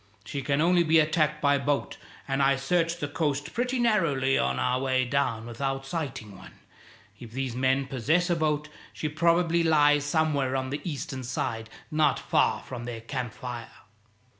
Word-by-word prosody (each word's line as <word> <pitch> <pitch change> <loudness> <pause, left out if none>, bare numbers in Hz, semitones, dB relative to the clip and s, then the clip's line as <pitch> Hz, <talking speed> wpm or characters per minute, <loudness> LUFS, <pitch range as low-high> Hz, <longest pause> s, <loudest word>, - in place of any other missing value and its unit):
She 140 - -4
can 140 +2 0
only 175 +1 +4
be 165 -1 +4
attacked 155 -1 +2
by 140 0 +4
boat, 140 +1 -1 0.3
and 135 0 0
I 135 0 +4
searched 165 +5 0
the 145 - -1
coast 145 -1 -2
pretty 250 +2 -1
narrowly 165 - +2
on 65 0 +1
our 125 - +1
way 130 -1 +1
down 120 -4 -1
without 135 +3 -3
sighting 135 - -5
one. - - -13 0.7
If 120 - -9
these 130 -2 -3
men 130 +2 +1
possess 145 +7 +1
a - - +3
boat, 150 -2 0 0.3
she 155 - -3
probably 170 +2 +2
lies 150 -3 +4
somewhere 145 -3 +1
on 130 0 -2
the 145 - -3
eastern 140 -5 -4
side, 115 -2 -3 0.2
not 150 -4 +3
far - - +1
from 120 -2 -7
their 120 -2 -6
camp 125 0 -4
fire. 120 -2 -6
140 Hz, 170 wpm, -27 LUFS, 130-155 Hz, 0.7 s, only